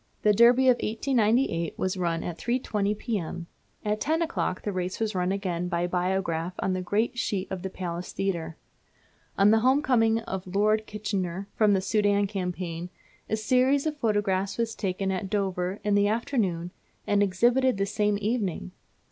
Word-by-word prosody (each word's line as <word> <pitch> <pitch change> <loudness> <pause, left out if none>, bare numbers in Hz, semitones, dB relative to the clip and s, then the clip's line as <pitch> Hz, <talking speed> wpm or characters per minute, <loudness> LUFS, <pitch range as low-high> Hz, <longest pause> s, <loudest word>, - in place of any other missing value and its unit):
The 210 - +5
Derby 240 +4 +6
of 250 -1 +6
1898 220 - +1
was 185 +1 -1
run 170 -3 -1
at 170 -2 -5
3.20 215 -4 -1
P.M. 180 -7 -3 0.4
At 210 0 -1
ten 320 +3 +1
o'clock 320 - -2
the 205 - -2
race 185 -1 -3
was 220 -1 -1
run 180 0 0
again 180 -3 -2
by 175 0 0
Biograph 180 -1 -1
on 190 - -1
the 185 - -2
great 215 +6 0
sheet 195 -4 -1
at 190 -2 -4
the 190 - -4
Palace 175 -1 -5
Theatre. 170 -5 -3 0.8
On 200 +1 +6
the 220 - +5
home 260 +5 +3
coming 225 -4 +3
of 190 -4 -5
Lord 215 +1 +2
Kitchener 200 -3 -3
from 210 -2 +4
the 190 - +2
Soudan 205 0 +2
Campaign, 180 -3 -4 0.4
a 220 - 0
series 255 +5 +2
of 310 -1 -1
photographs 205 -6 0
was 230 -1 -1
taken 195 -2 -2
at 190 +1 -3
Dover 190 -1 -1
in 210 0 +1
the 205 0 +4
afternoon 205 -7 -1 0.3
and 205 0 +2
exhibited 240 +6 +3
the 195 - +1
same 210 0 0
evening! 210 -5 -2
200 Hz, 170 wpm, -27 LUFS, 185-225 Hz, 0.8 s, Derby